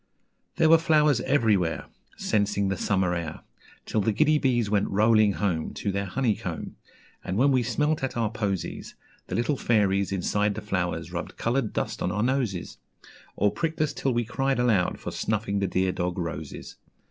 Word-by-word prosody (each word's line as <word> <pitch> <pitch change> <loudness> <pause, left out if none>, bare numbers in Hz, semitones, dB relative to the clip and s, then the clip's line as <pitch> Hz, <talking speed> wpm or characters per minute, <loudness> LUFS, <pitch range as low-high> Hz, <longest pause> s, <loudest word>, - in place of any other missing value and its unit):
There 160 - +4
were 165 +1 +7
flowers 150 -6 +3
everywhere, 105 -12 +1 0.3
Censing 100 -1 0
the 95 - 0
summer 95 -1 +1
air, 85 -2 -4 0.4
Till 110 - 0
the 110 - +1
giddy 155 +7 +3
bees 120 -6 +1
went 100 -1 +1
rolling 110 0 +4
home 90 -6 -2
To 100 - -2
their 100 +1 -2
honeycomb, 115 +2 -2 0.5
And 95 - -3
when 140 +4 +4
we 130 -2 +3
smelt 150 +5 0
at 130 - -2
our 115 -3 0
posies, 100 -5 -3 0.3
The - - -4
little 130 +5 0
fairies 100 -5 +2
inside 105 +2 0
the 110 - -5
flowers 90 -5 -2
rubbed 85 -1 -5
coloured 120 -1 0
dust - - -3
on - - 0
our 105 +1 0
noses, 120 -8 -1 0.6
Or 105 +1 +2
pricked 165 -1 -3
us 155 -2 +1
till 135 - -1
we 120 -1 0
cried 135 +3 0
aloud 110 -7 +2
for - - -5
snuffing 105 -2 -1
the 100 - 0
dear 95 +1 +1
dog 90 0 -2
roses. 80 -4 -6
105 Hz, 175 wpm, -26 LUFS, 95-125 Hz, 0.6 s, were